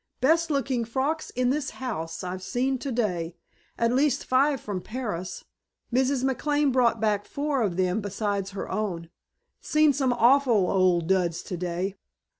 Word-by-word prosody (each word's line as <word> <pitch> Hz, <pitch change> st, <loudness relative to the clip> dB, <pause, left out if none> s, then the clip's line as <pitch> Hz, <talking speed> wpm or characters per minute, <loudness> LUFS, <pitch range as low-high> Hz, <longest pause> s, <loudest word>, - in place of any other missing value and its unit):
"Best 325 Hz, +6 st, +3 dB
looking 270 Hz, -4 st, 0 dB
frocks 270 Hz, +7 st, -2 dB
in 250 Hz, 0 st, 0 dB
this 290 Hz, 0 st, -1 dB
house 185 Hz, -11 st, -4 dB
I've 185 Hz, +1 st, -4 dB
seen 255 Hz, +6 st, -1 dB
today. 205 Hz, -, -2 dB, 0.4 s
At 230 Hz, +1 st, +2 dB
least 275 Hz, +1 st, +2 dB
five 275 Hz, +2 st, +3 dB
from 200 Hz, -4 st, -4 dB
Paris. 210 Hz, -6 st, -5 dB, 0.5 s
Mrs. 260 Hz, +1 st, +2 dB
McLane 290 Hz, +2 st, +1 dB
brought 240 Hz, -3 st, +3 dB
back 210 Hz, -2 st, +1 dB
four 285 Hz, +1 st, -2 dB
of 190 Hz, -6 st, 0 dB
them 185 Hz, +3 st, +1 dB
besides 200 Hz, -1 st, -2 dB
her 195 Hz, -1 st, -5 dB
own. 180 Hz, -5 st, -3 dB, 0.5 s
Seen 305 Hz, -1 st, +3 dB
some 265 Hz, -2 st, +1 dB
awful 240 Hz, -5 st, +4 dB
old 180 Hz, -3 st, +3 dB
duds 175 Hz, -2 st, +1 dB
today. 180 Hz, +2 st, -3 dB
230 Hz, 145 wpm, -26 LUFS, 185-270 Hz, 0.5 s, awful